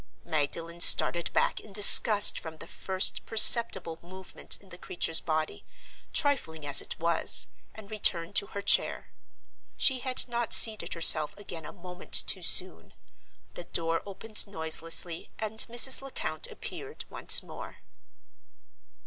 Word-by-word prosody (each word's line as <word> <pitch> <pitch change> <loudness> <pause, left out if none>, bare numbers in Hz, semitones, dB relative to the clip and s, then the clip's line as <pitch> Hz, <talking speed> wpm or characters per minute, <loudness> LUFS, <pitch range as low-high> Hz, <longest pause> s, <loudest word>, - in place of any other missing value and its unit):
Magdalen 165 +3 -6
started 170 -1 +1
back - - -3
in 210 - -18
disgust 205 +1 +8
from 160 -1 -13
the - - -12
first 190 0 -3
perceptible 190 -7 +3
movement 185 +2 -6
in 195 - -24
the 180 - -14
creature's 165 -2 -4
body, 155 -1 -7 0.5
trifling 160 - -5
as 145 0 +2
it - - -12
was, 170 0 -1 0.3
and 220 -1 -16
returned 175 -5 0
to 200 - -2
her 200 - -11
chair. - - -2 0.7
She 265 -3 0
had 255 0 -3
not 240 -1 -3
seated 220 -5 +3
herself 155 -2 +2
again 170 -6 -12
a - - -12
moment 180 0 -16
too - - -4
soon. - - -3 0.6
The 175 - -12
door 165 -1 -6
opened 210 +2 -3
noiselessly, 165 -1 -3
and 220 0 -9
Mrs. 240 +3 +4
Lecount 275 - -7
appeared 440 -2 -13
once - - +1
more. - - -14
185 Hz, 135 wpm, -24 LUFS, 165-220 Hz, 0.7 s, disgust